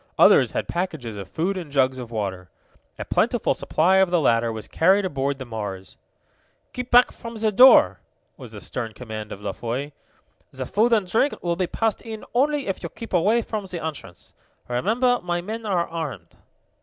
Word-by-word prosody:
Others - - +6
had - - -2
packages 160 - -4
of 100 -2 -7
food 185 +4 -2
and 165 -6 -7
jugs 130 -2 +2
of 120 -2 -7
water. 95 -5 -4 0.5
A - - -5
plentiful - - +1
supply 185 +5 +2
of 190 -1 +4
the 175 -1 +2
latter 115 -5 +2
was 110 -1 -7
carried 190 +4 +3
aboard 140 -4 -2
the 130 - -7
Mars. 105 -5 -6 0.8
"Keep 250 0 -5
back 245 +1 +6
from 230 0 -9
the 220 -1 0
door!" 210 - +7 0.4
was - - -11
the - - -9
stern 115 -3 -5
command 110 -1 -7
of 100 - -8
La 100 -1 -3
Foy. 125 +8 -4 0.6
"The 130 -1 -5
food 220 - +1
and 215 -4 +3
drink 225 +10 +1
will 170 -1 0
be 180 0 -1
passed 225 +2 -1
in 220 -2 -8
only 285 +3 +1
if 195 - -3
you 170 - -5
keep 230 +4 -10
away 210 +7 +3
from 215 -2 -4
the 180 -4 -6
entrance. 150 - -8 0.3
Remember 230 - +1
my 175 0 -2
men 220 +5 -6
are 180 -4 0
armed!" 145 - -6
170 Hz, 190 wpm, -23 LUFS, -, 0.8 s, door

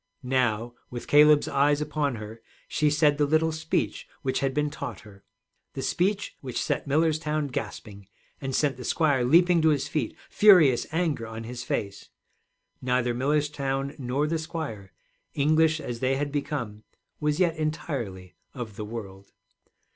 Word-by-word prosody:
Now, 120 -3 0 0.2
with 120 -1 -6
Caleb's 150 0 +6
eyes 145 +1 +2
upon 150 -3 -1
her, 110 +1 -9 0.3
she 150 0 +1
said 150 -1 +3
the 145 - +3
little 160 +2 +2
speech 160 +1 -2 0.2
which 130 -2 0
had 135 -1 0
been 150 +1 -1
taught - - -6
her, 100 -2 -16 0.5
the 135 - -5
speech 195 +7 0
which 125 -3 -4
set - - -2
Millerstown 155 0 +1
gasping, 105 -6 -6 0.3
and 135 -1 -3
sent 140 -4 +1
the 125 - -8
squire 145 -3 +2
leaping 170 +6 +5
to 160 - +4
his 145 -3 +1
feet, 140 -8 -2
furious 165 - +6
anger 160 -8 -1
on 115 0 -7
his 120 +1 -6
face. 100 -4 -4 0.7
Neither 125 -1 +1
Millerstown 140 0 -1
nor 135 +3 0
the 160 +1 -1
squire, 145 - -6 0.4
English 155 +2 +3
as 120 -5 -5
they 130 +2 +1
had 145 +1 -2
become, 140 -8 -4 0.4
was 150 +1 0
yet 175 -3 +2
entirely 130 - -4 0.2
of 115 -5 -7
the 105 - -4
world. 100 -3 -8
140 Hz, 155 wpm, -26 LUFS, 120-155 Hz, 0.7 s, Caleb's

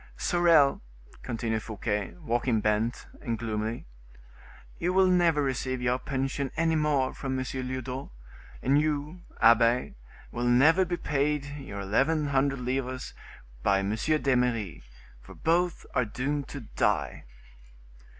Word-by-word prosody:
"Sorel," 165 -5 +4 0.4
continued 110 -1 -2
Fouquet, 105 -1 -3
walking 120 -1 +1
bent, 105 +3 0 0.2
and 115 -1 -2
gloomily, 110 0 -3 0.9
"you 175 +2 0
will 190 0 +5
never 175 -5 +3
receive 130 -1 -2
your 125 +1 0
pension 135 0 -2
any 165 0 +2
more 150 -4 +1
from 130 -1 -3
M. 130 - -2
Lyodot; 130 0 -4 0.5
and 140 +3 +4
you, 155 +3 -2 0.2
abbe, 115 +2 +4 0.4
will 120 +1 -3
never 155 +10 +5
be 175 0 -2
paid 145 -1 0
you 140 -7 -8
eleven 140 +10 +1
hundred 135 -1 +1
livres 130 0 -3 0.5
by 100 +9 +3
M. 100 +1 -1
d'Eymeris; 125 - 0 0.4
for - - -13
both 175 +2 0
are 125 - +2
doomed 135 +6 -3
to 140 - -7
die." 110 - -1
130 Hz, 125 wpm, -28 LUFS, 115-150 Hz, 0.9 s, will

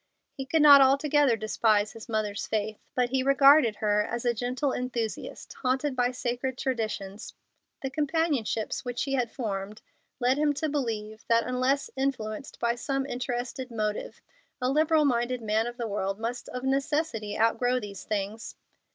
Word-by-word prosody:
He 270 -1 -6
could 315 +2 +3
not 285 -2 +10
altogether 275 -1 +4
despise 215 -1 +1
his 225 +2 -11
mother's 215 -2 -2
faith, 215 -1 -2 0.2
but 250 -1 +2
he 265 -1 +2
regarded 275 -3 +6
her 210 0 +1
as 235 +3 -3
a 240 - +3
gentle 250 +4 -1
enthusiast 240 -3 -4
haunted 265 +2 0
by 245 -1 +2
sacred 250 0 -3
traditions. 215 -6 -3 0.5
The 270 - -2
companionships 290 -7 -1
which 245 -1 -2
he 275 - -3
had 250 -3 +1
formed 210 -3 -5 0.4
led 255 +2 +2
him 300 -1 +3
to 310 +3 -2
believe 220 -6 -3
that 230 0 +3
unless 255 +2 0
influenced 265 -3 -3
by 235 0 +1
some 270 +2 -2
interested 250 0 -4
motive 215 -2 -3 0.4
a 255 0 0
liberal 310 +1 +3
minded 245 -2 0
man 220 +2 +1
of 240 0 -7
the 235 -2 -3
world 195 -1 -2
must 235 +2 -4
of 250 0 -6
necessity 270 -5 -1
outgrow 245 +3 +2
these 205 -4 -8
things. 210 +1 -4
245 Hz, 160 wpm, -28 LUFS, 220-270 Hz, 0.5 s, not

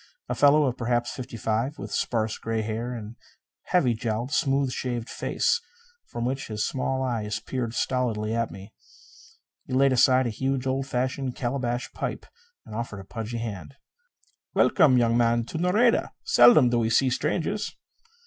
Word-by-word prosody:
A - - 0
fellow 145 +1 +5
of 130 -3 -1
perhaps 120 0 0
fifty 120 -2 -7
five, 115 +7 -1
with - - -7
sparse 110 -2 -1
gray 115 -1 -2
hair 115 +3 -3
and 110 -2 -7
a - - -30 0.5
heavy 140 -10 +3
jowled, 115 +3 -3
smooth 135 -3 +1
shaved 120 -2 -3
face 475 - 0 0.5
from 120 - -4
which 135 +2 -2
his 105 -1 -2
small 130 0 -1
eyes 110 -4 -2
peered 120 0 -4
stolidly 115 -5 -1
at 115 0 0
me. 100 +3 -11 0.9
He 130 - -5
laid 135 +1 +4
aside 130 +1 +4
a 120 - -1
huge, 135 +3 -2
old 135 +1 -1
fashioned 130 0 -2
calabash 120 -1 -2
pipe - - -4 0.4
and - - -11
offered 110 -3 -5
a - - -13
pudgy 115 +3 -5
hand. 115 +1 -6 0.8
"Welcome, 130 -5 +5
young 115 -1 +3
man, 120 -1 +2
to 160 - -5
Nareda. 210 +7 +2
Seldom 245 - +6
do 120 - +2
we 110 -1 +1
see 130 +3 +3
strangers." 170 +9 -1
120 Hz, 165 wpm, -26 LUFS, 115-135 Hz, 0.9 s, Seldom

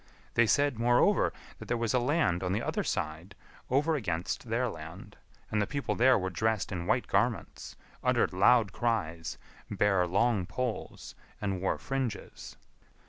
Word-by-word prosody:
They 120 -1 +4
said, 140 +2 +2
moreover, 120 +1 +3 0.3
that - - -9
there 120 - 0
was 115 -2 -1
a 125 - +4
land 125 - +1
on 90 0 -1
the 105 - 0
other - - -1
side 80 +6 -3 0.3
over 145 +5 +2
against 90 - -3
their - - +1
land, - - -9 0.4
and 105 - +1
the 105 - 0
people 140 -1 -2
there 130 +2 +5
were 95 -1 -2
dressed 110 +3 0
in 90 -2 -4
white 125 - +2
garments, 110 +3 -1 0.3
uttered - - +2
loud 105 +2 +4
cries, 90 -9 -2 0.3
bare 95 -3 +2
long 100 0 +1
poles, 125 -3 -4 0.3
and 95 -3 -2
wore 95 - 0
fringes. 130 -6 -5
110 Hz, 155 wpm, -30 LUFS, 95-125 Hz, 0.4 s, there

